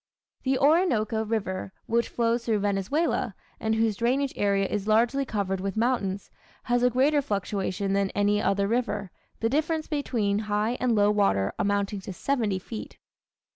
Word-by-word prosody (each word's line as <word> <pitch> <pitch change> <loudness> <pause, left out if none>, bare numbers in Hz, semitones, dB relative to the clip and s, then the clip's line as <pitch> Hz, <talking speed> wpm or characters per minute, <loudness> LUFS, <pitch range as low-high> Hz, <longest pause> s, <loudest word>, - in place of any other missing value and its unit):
The 265 0 +1
Orinoco 260 - +2
River, 195 -4 -3
which 235 0 0
flows 235 0 0
through 225 -2 +1
Venezuela, 205 - 0 0.2
and 220 0 0
whose 220 -2 +1
drainage 260 +4 +1
area 200 -1 +1
is 205 +1 -3
largely 235 +6 +3
covered 195 -5 -2
with 195 +2 -3
mountains, 210 -5 -1 0.3
has 245 0 +1
a 250 - +4
greater 280 +4 +3
fluctuation 195 -3 -2
than 200 0 +1
any 205 +1 +2
other 200 0 +1
river, 210 -4 -1 0.3
the 225 - +2
difference 310 +3 0
between 230 -9 0
high 210 +3 +1
and 250 -2 +2
low 205 0 +4
water 100 - +2
amounting 200 0 0
to 190 - -7
seventy 220 -2 0
feet. 215 +4 -8
215 Hz, 155 wpm, -26 LUFS, 200-245 Hz, 0.3 s, a